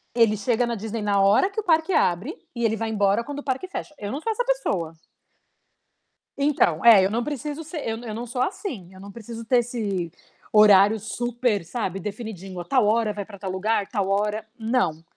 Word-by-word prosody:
ele 225 -3 +4
chega 240 +3 +1
na 235 - -2
Disney 220 +1 -4
na 200 -1 +1
hora 205 - +4
que 405 - -4
o - - -2
parque 325 +1 +2
abre 190 - +1 0.2
e 235 - -3
ele 220 0 +2
vai 225 0 -3
embora 205 +1 +2
quando 285 +2 -6
o - - -8
parque 265 +7 -2
fecha, 325 -4 -6
eu 205 0 -5
não 280 - -3
sou 450 - -1
essa - - -1
pessoa. 195 - -1 1.5
Então, 275 - +2
eh, 210 -5 +8
eu 195 - +1
não 235 +2 -1
preciso 295 +2 -4
ser 320 +1 -6
eu 225 - -1
eu 230 -3 -6
não 240 +2 -5
sou, 245 +2 -2
assim, 240 - -4
eu 190 - -14
não 200 +1 -10
preciso 230 +2 -8
ter 245 +2 +3
esse 205 -8 -2 0.4
horário 210 0 +6
super, 240 -2 -1
sabe, 195 0 -3
definidinho, 195 -3 -6
a - - -5
tal 250 0 +2
hora 220 0 +2
vai 205 -1 -4
pra 200 -1 -12
tal 190 -1 -5
lugar, 200 +2 0
tal 200 -5 -1
hora, 210 +2 0
não. 220 -9 0
220 Hz, 210 wpm, -24 LUFS, 200-245 Hz, 1.5 s, eh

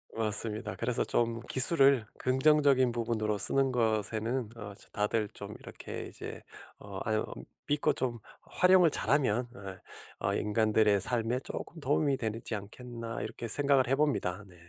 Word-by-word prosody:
맞습니다. 110 0 -1
그래서 120 0 -1
좀 115 -1 -1
기술을 135 -3 +6
긍정적인 130 -1 +3
부분으로 110 -3 -2
쓰는 135 +7 +3
것에는 110 +1 -1
어 105 -3 -8
저 - - -13
'다들 105 +1 -1
좀 - - -8
이렇게 - - -8
이제 - - -9 0.4
어 100 -1 -8
아유 110 0 -1 0.4
믿고 145 0 +1
좀 120 -2 -2 0.2
활용을 180 -2 +4
잘 - - -1
하면 125 -4 +2 0.7
어 - - -2
어 - - 0
인간들의 105 -1 +2
삶에 120 +3 0
조금 170 - -7
도움이 145 -1 +1
되지 110 0 -4
않겠나.' 115 +3 -7
이렇게 115 +1 -6
생각을 140 +1 +2
해 135 - +2
봅니다. 105 -10 -1
네. 90 - -17
115 Hz, 305 characters per minute, -30 LUFS, 110-135 Hz, 0.7 s, 기술을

